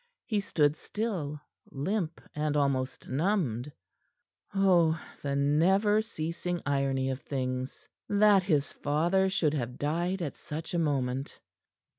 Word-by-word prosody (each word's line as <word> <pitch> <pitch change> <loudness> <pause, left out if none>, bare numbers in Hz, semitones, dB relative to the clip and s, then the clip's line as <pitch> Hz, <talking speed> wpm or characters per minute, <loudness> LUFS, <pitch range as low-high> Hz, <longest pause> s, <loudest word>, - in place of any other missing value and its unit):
He 215 -4 0
stood 150 -6 +2
still, 170 -7 -3 0.3
limp 170 +4 -2
and 150 0 0
almost 135 -2 0
numbed. 150 - 0 0.8
Oh, 175 -5 +4 0.2
the 140 -1 -1
never 190 +10 +3
ceasing 175 -3 -3
irony 135 -2 +1
of 130 +1 -5
things! 130 -2 -4 0.2
That 205 -1 +5
his 150 -7 0
father 170 +6 +2
should 180 -6 +1
have 125 -4 -3
died 175 +5 -1
at 145 - -4
such 155 +3 -6
a 175 - +1
moment. 135 -3 -1
155 Hz, 120 wpm, -29 LUFS, 140-190 Hz, 0.8 s, That